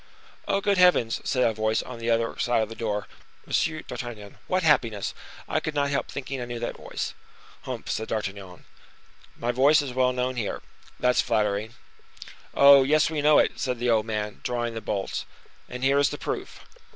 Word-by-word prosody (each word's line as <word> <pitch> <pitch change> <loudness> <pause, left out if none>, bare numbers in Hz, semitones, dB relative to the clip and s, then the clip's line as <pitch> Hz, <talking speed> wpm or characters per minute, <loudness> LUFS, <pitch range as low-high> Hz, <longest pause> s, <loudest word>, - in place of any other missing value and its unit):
"Oh! 195 - +1
good 200 -2 +1
heavens!" 180 -11 +4
said 125 -2 +1
a 115 - +3
voice 110 +1 0
on 125 -2 -9
the 115 0 -2
other 115 0 +1
side 120 -2 +2
of 110 - -5
the 115 - -8
door. 105 -3 -3 0.4
"Monsieur 155 -1 0
d'Artagnan. 120 -6 -8
What 185 0 +1
happiness! 115 -10 +2 0.3
I - - 0
could 155 - -4
not 140 -1 +1
help 140 - -1
thinking 135 -1 -5
I - - -3
knew 120 0 -5
that 120 - -4
voice." - - -5 0.5
"Humph!" - - -6
said 110 0 -2
D'Artagnan. 100 -4 -5 0.7
"My 120 +1 -1
voice 140 +5 +5
is 135 -4 -4
known 125 0 +1
here! 110 -4 -3 0.4
That's 125 0 +3
flattering." 105 -1 -1 0.8
"Oh! 140 0 +8
yes, 155 +4 +3
we 155 -2 -1
know 150 +1 +5
it," - - +2
said 125 -3 -1
the 120 0 +1
old 110 -1 +2
man, 105 -1 -3
drawing 120 -1 -2
the 115 - -5
bolts; 100 -2 -3 0.4
"and 125 +1 -6
here 135 +1 +4
is 140 - +3
the - - -5
proof." - - -5
120 Hz, 190 wpm, -26 LUFS, 110-140 Hz, 0.8 s, Oh